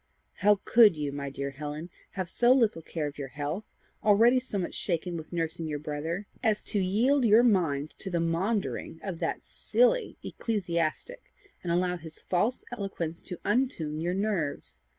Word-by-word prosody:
"How 210 +1 +5
COULD 220 -8 +6
you, 145 -2 -2
my 140 0 -4
dear 140 0 -4
Helen, 150 +4 -6 0.2
have 185 -2 -3
so 240 +7 +3
little 225 -10 +2
care 160 -1 -3
of 145 0 -6
your 140 - -3
health, 145 +9 -4 0.4
already 230 +5 +6
so 250 -5 -4
much 180 - -2
shaken 175 -1 -2
with 160 -2 -7
nursing 165 -1 -2
your 150 -1 -2
brother, 155 +6 -4 0.2
as 220 -3 +1
to 205 - +2
yield 230 +9 +3
your 225 +1 +6
mind 160 - +2
to 195 - -4
the 175 -2 0
maundering 170 +1 -1
of 185 -4 -4
that - - -2
silly - - +1
ecclesiastic, 200 - -2 0.3
and 175 - -2
allow 180 +1 +1
his 160 -1 -7
false 210 +8 0
eloquence 195 -7 -4
to 180 - -7
untune 200 - 0
your 175 +2 0
nerves! 180 - -2
180 Hz, 170 wpm, -29 LUFS, 155-215 Hz, 0.4 s, COULD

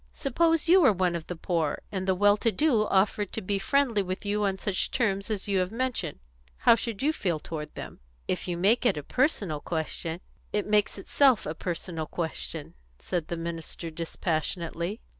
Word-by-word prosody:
Suppose 325 +4 +1
you 365 +3 +7
were 270 - +7
one 180 -3 +1
of 165 -2 -5
the 180 - -4
poor, 165 -2 -1
and 190 -1 -3
the 190 - +3
well 205 +2 +5
to 230 +2 +1
do 235 -6 +2
offered 200 +1 +2
to - - -2
be 195 +1 0
friendly 240 0 +2
with 185 +1 -4
you 210 +1 0
on 195 -1 0
such 190 -1 -1
terms 200 -4 0
as 210 -2 -2
you 195 -2 +2
have 185 +1 0
mentioned, 255 - -2 0.4
how - - +6
should 230 -1 -3
you 305 +2 +3
feel 180 - -1
toward 150 0 -6
them?" - - -8 0.3
"If - - -2
you 175 -1 -2
make 205 +7 +3
it 240 -10 +3
a 150 - -4
personal 200 - 0
question 160 +1 -3 0.2
" - - -35
"It 210 - +1
makes 210 -1 +2
itself 255 +4 +3
a 155 - -2
personal 165 -1 -4
question," 155 - -4 0.2
said 170 - -3
the 170 - -3
minister 165 0 -5
dispassionately. 170 +3 -3
195 Hz, 195 wpm, -28 LUFS, 170-220 Hz, 0.4 s, you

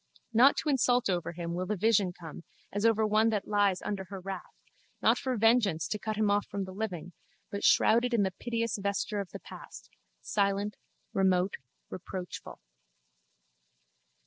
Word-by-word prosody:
Not 250 +5 +6
to 310 - -1
insult 245 -4 +3
over 175 -1 -2
him 170 0 -4
will 180 +1 -3
the 210 - 0
vision 205 -2 +3
come 170 -1 -10 0.3
as 205 +3 +2
over 220 -1 +3
one 215 +1 +3
that 210 -3 -2
lies 205 -3 +2
under 195 -2 -3
her 195 +1 -7
wrath, 190 +1 -7 0.4
not - - +3
for 255 -2 -2
vengeance 215 -8 +3
to 210 - -2
cut 215 +1 -3
him 210 -1 +2
off 205 0 +1
from 200 -1 -3
the 190 - -7
living 185 -4 -5 0.4
but 200 - -4
shrouded 240 +2 +4
in 230 -4 +3
the 190 - 0
piteous 230 -3 -2
vesture 200 +1 -1
of 195 -3 -4
the - - -7
past, - - -12 0.3
silent, 200 0 0 0.4
remote, 190 0 +2 0.3
reproachful. 180 0 -7
205 Hz, 165 wpm, -30 LUFS, 190-220 Hz, 0.4 s, Not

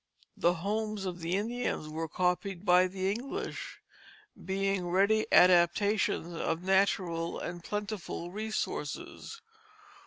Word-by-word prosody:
The 175 +1 +2
homes 210 +3 -2
of 180 -1 -4
the 170 +2 -1
Indians 230 -5 -2
were 160 +1 -4
copied 180 +3 -1
by 180 0 +6
the 190 +1 -1
English, 245 +6 -5 0.6
being 195 -1 -1
ready 200 +4 +3
adaptations 180 0 +4
of 165 +1 -2
natural 185 -3 +1
and 175 -1 -6
plentiful 205 -4 -4
resources. 220 - -4
190 Hz, 105 wpm, -30 LUFS, 175-205 Hz, 0.6 s, by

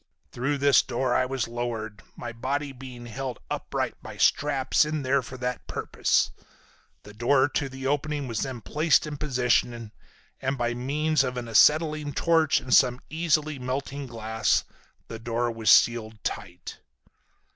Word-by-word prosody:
Through 135 +4 -1
this 140 -1 +5
door 125 0 -1
I 130 - +2
was 130 -3 -2
lowered, 115 -3 -4
my 120 - -6
body 140 +4 -2
being 125 -2 -10
held 125 +1 -5
upright - - -2
by - - -10
straps 140 -2 +3
in 150 -1 -2
there 135 +1 +2
for 130 +1 -9
that 125 0 -4
purpose. - - 0 0.7
The 105 - -12
door 130 +5 +3
to 140 -1 -2
the 135 0 -8
opening 145 0 -1
was 115 -3 -3
then 130 -3 -4
placed 155 +5 +2
in 150 -1 -5
position, 120 -5 0 0.5
and 135 +1 -1
by 120 -1 0
means 145 +4 +1
of 125 -1 -3
an 120 -1 -4
acetylene 150 +5 +3
torch 160 -1 +3
and 130 - -3
some 125 -2 +5
easily 155 -3 0
melting 135 +2 -4
glass, 110 -1 0 0.4
the 115 - -7
door 120 +1 -1
was 115 -1 -1
sealed 110 -2 +4
tight. 90 -3 -6
130 Hz, 155 wpm, -26 LUFS, 120-145 Hz, 0.7 s, this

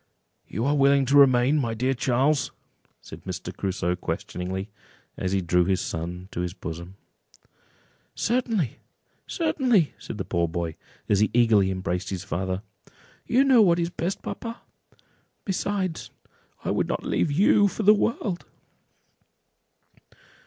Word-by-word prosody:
"You 110 +6 -3
are 145 +1 +2
willing 140 -1 +4
to 140 +3 +2
remain, 135 +1 +5
my 115 -4 -1
dear 130 +4 +1
Charles?" 135 +4 +1 0.5
said - - -11
Mr. - - -6
Crusoe, 90 -2 -1
questioningly, 95 +3 -4 0.4
as 95 - -2
he 95 0 +1
drew 90 0 +2
his 95 0 +1
son 90 +3 -5
to - - -5
his 90 +1 -4
bosom. 85 +3 -7 1.2
"Certainly, 225 - 0 0.5
certainly!" 255 - +1
said - - -7
the - - -3
poor 85 0 0
boy, 85 -1 -3 0.3
as 100 - +3
he 105 - +3
eagerly 110 -5 +4
embraced 95 -1 -2
his 95 -3 -4
father; 95 +3 -3 0.6
"you 255 +3 +4
know 265 -4 +6
what 175 -5 +5
is 170 0 -1
best, 175 +3 -3
papa: 230 0 -6 0.8
besides, 190 -3 -2 0.5
I - - -1
would - - 0
not - - -3
leave - - +1
you 205 +6 +4
for 215 - -4
the 210 +2 +8
world." 205 -4 -1
125 Hz, 140 wpm, -25 LUFS, -, 1.2 s, the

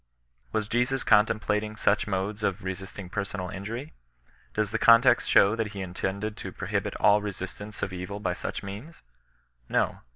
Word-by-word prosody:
Was 110 -1 -1
Jesus 125 +4 +1
contemplating 105 0 +2
such 105 0 +2
modes 100 +2 -2
of 100 -1 -1
resisting 95 0 -6
per 100 +3 -2
sonal 95 -2 -5
injury? 115 +10 -6 0.6
Does 105 -1 0
the 115 - -1
context 115 +1 +6
show 100 +3 +6
that 115 -2 -2
he 100 - -5
intended 95 +3 -3
to - - -6
prohibit - - -2
all 105 0 +4
resistance 100 +1 -6
of 95 - -2
evil 90 +3 -5
by 90 - -1
such - - -5
means? 105 +12 -8 0.7
No. - - +1
105 Hz, 160 wpm, -27 LUFS, 95-110 Hz, 0.7 s, context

